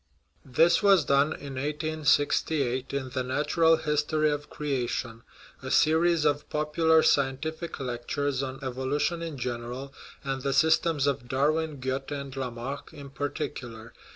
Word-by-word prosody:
This 160 +6 +3
was 195 -6 +5
done 140 +1 +4
in 140 -3 -7
1868, 145 -3 0
in 140 -2 -3
The 130 - -1
Natural 150 +5 +2
History 150 0 +1
of 145 0 -4
Creation 125 -5 -3 0.4
(a - - -6
series 160 0 +3
of 145 0 0
popular 160 +1 +3
scientific 155 +5 0
lectures 130 +2 -2
on 135 -1 -4
evolution 135 +6 -1
in 165 -4 -5
general, 125 +2 -5 0.3
and 135 -1 -3
the 135 0 -1
sys 160 +4 +4
tems 160 -5 0
of 130 -4 -1
Darwin, 150 +3 0
Goethe, 130 +2 -3
and 140 -2 -5
Lamarck 130 +1 -5
in 140 -3 -11
particular). 135 -5 -5
140 Hz, 135 wpm, -27 LUFS, 130-155 Hz, 0.4 s, was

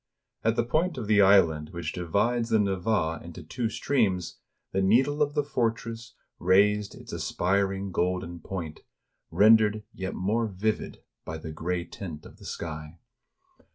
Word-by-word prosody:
At 115 0 +2
the 120 - +2
point 160 +6 0
of 120 - -3
the 105 0 +4
island 85 -6 +5
which 85 -2 -5
divides 115 +7 0
the 110 - +4
Neva 95 -4 0
into 85 0 -9
two 115 - -2
streams, 100 - 0 0.3
the 95 - 0
needle 130 +10 +3
of 145 0 +1
the 145 - +2
fortress 115 -3 -2 0.2
raised 100 +3 +3
its - - -11
aspiring 95 +1 0
golden 90 -1 -1
point, 85 -3 -6 0.5
rendered 110 0 +5
yet 95 0 -4
more 110 +5 0
vivid 105 +2 -3 0.2
by 80 - -5
the 80 0 -7
gray 85 +3 -2
tint 80 -7 -8
of - - -13
the - - -14
sky. 75 0 -6
100 Hz, 150 wpm, -27 LUFS, 85-115 Hz, 0.5 s, island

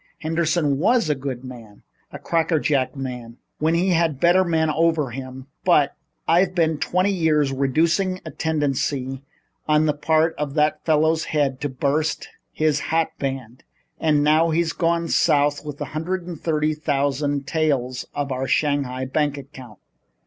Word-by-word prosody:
Henderson 160 -3 0
was 225 -2 +2
a - - +3
good 135 -2 -5
man 115 -5 -11 0.3
a - - -7
crackerjack 155 -5 0
man 125 -3 -6 0.2
when 160 +2 +2
he 180 +3 +1
had 170 -2 +3
a - - -6
better 175 +6 +4
man 160 -3 +1
over 160 -4 +1
him. 130 0 -8 0.2
But 150 -6 +3 0.3
I've 180 +2 +3
been 160 -3 +1
twenty 185 +5 +1
years 155 -6 +2
reducing 165 +8 +1
a - - -6
tendency 140 -4 -2 0.5
on 155 0 +3
the 150 - +2
part 160 +2 +1
of 145 -1 -3
that 150 0 +1
fellow's 160 0 +2
head 140 -4 -1
to 145 - -1
bust 145 +3 -1 0.2
his 155 -2 +1
hat 165 +2 0
band. 130 -2 -5 0.4
And 150 -2 +2
now 155 +2 +4
he's 165 +1 0
gone 170 0 0
south 145 -3 +2
with 150 -2 -7
a - - -3
hundred 175 +3 -3
and 170 -3 -8
thirty 155 -1 0
thousand 145 -1 -1
taels 135 -5 -1
of 145 -1 -2
our 130 +1 -2
Shanghai 135 -2 0
bank 145 +2 -1
account." 130 -6 -11
150 Hz, 155 wpm, -22 LUFS, 135-165 Hz, 0.5 s, better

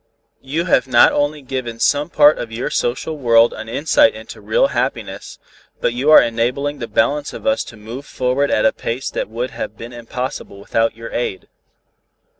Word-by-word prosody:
You 155 +6 -2
have 130 -8 +2
not 120 -2 +6
only 145 0 -1
given 125 -3 -5
some 145 +6 +1
part 150 -2 +5
of 115 - -5
your 115 +2 -4
social 145 +6 -2
world 115 -2 +4
an 110 0 -8
insight 160 - +3
into - - -10
real - - +2
happiness, - - -4 0.4
but - - 0
you 130 +5 0
are 155 - +10
enabling 125 +5 -1
the 120 - -4
balance 145 +3 0
of - - -9
us 275 0 +1
to 115 - -12
move 115 +6 -9
forward 130 +3 0
at 110 - +2
a 140 - +4
pace 120 +3 -4
that - - -3
would 120 +3 -4
have 110 - -6
been 115 +2 -9
impossible 120 -2 -6
without 115 +3 -1
your 115 0 -8
aid." 110 -6 -4
125 Hz, 185 wpm, -19 LUFS, 115-145 Hz, 0.4 s, are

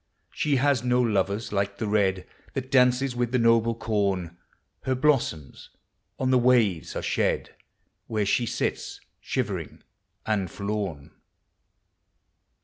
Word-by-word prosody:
She 150 -2 0
has 135 -2 +2
no 125 0 +2
lovers 105 -2 0
like 100 0 -1
the 110 - -3
Red 95 -3 +1 0.3
That 130 -1 -4
dances 125 0 +3
with 120 -1 -1
the 125 - +2
noble 115 -1 +3
Corn: 100 -6 -1 0.5
Her 130 - -1
blossoms 125 - 0 0.5
on 130 -1 0
the 130 - +5
waves 120 -9 +2
are - - -3
Bhed, - - 0 0.6
Where 110 -2 -1
she 120 +4 +1
sits 120 - -3 0.2
shivering - - -4 0.4
and 100 -4 0
forlorn. 100 -8 -4
115 Hz, 125 wpm, -26 LUFS, 100-125 Hz, 0.6 s, the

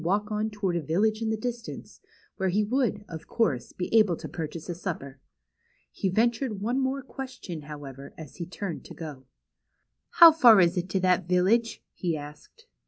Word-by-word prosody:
6i - - -10
walk 205 +5 0
on 215 +1 -1
toward 205 -4 -2
a 170 - 0
village 210 +9 +1
in 225 - -1
the 220 - 0
distance^ 235 0 -6 0.4
where 190 -1 0
he 205 +4 +2
would; 215 -2 0
of 165 -2 -9
course; 180 - 0
be 180 - -4
able 210 -6 +5
to - - -8
purchase 160 -1 -6
a 175 - -3
supper. 155 -7 -6 0.7
He 195 - -2
ventured 225 +2 0
one 240 +6 -1
more 270 +1 -1
question; 250 - -7
liowever; 140 -2 -9
as 155 -4 -11
he 170 - -5
turned 180 -1 -5
to 150 -5 -9 0.9
How 340 -8 +9
far 240 -9 +7
is 175 0 +4
it 180 0 -2
to 190 - 0
that 185 -1 +2
village?'' 195 +6 +2
he 170 -3 -2
asked. 150 - -12
190 Hz, 180 wpm, -27 LUFS, 165-225 Hz, 0.9 s, How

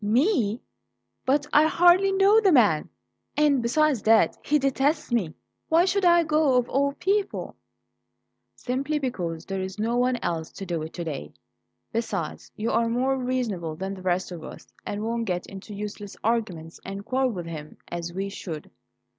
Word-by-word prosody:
"Me? 235 - +2 0.7
But 285 +2 +3
I 300 +1 +6
hardly 355 +4 +5
know 395 +3 +5
the 395 -3 +4
man; 210 - +4 0.5
and 290 -3 +4
besides 265 +1 +2
that, 220 +1 +4
he 300 - +3
detests 275 +2 0
me. 195 -10 0 0.3
Why 330 +2 +5
should 385 0 +1
I 345 -1 +6
go, 305 -4 +3
of 245 -1 +2
all 280 +1 +1
people?" 395 +5 -1 1.0
"Simply 275 +4 -2
because 175 - -3
there's 190 0 -4
no 225 +3 0
one 250 0 +2
else 160 -2 -2
to 195 - -7
do 170 -3 -2
it 160 +1 -6
to 175 - -4
day. 140 - -5 0.6
Besides, 230 0 -3
you 220 +2 -2
are 230 0 +2
more 255 +3 +1
reasonable 240 -11 -2
than 190 +4 -4
the 190 - -9
rest 185 0 0
of 170 -3 -7
us, - - -10 0.2
and 205 +1 -3
won't 230 +1 -1
get 180 -3 -2
into 195 +2 -9
useless 205 0 -7
arguments 195 -8 -2
and 195 +1 -6
quarrel 260 +1 +1
with 180 -7 -5
him, 155 -2 -8
as 175 0 -4
we 195 +3 -3
should." 170 -6 -7
230 Hz, 170 wpm, -26 LUFS, 190-280 Hz, 1.0 s, I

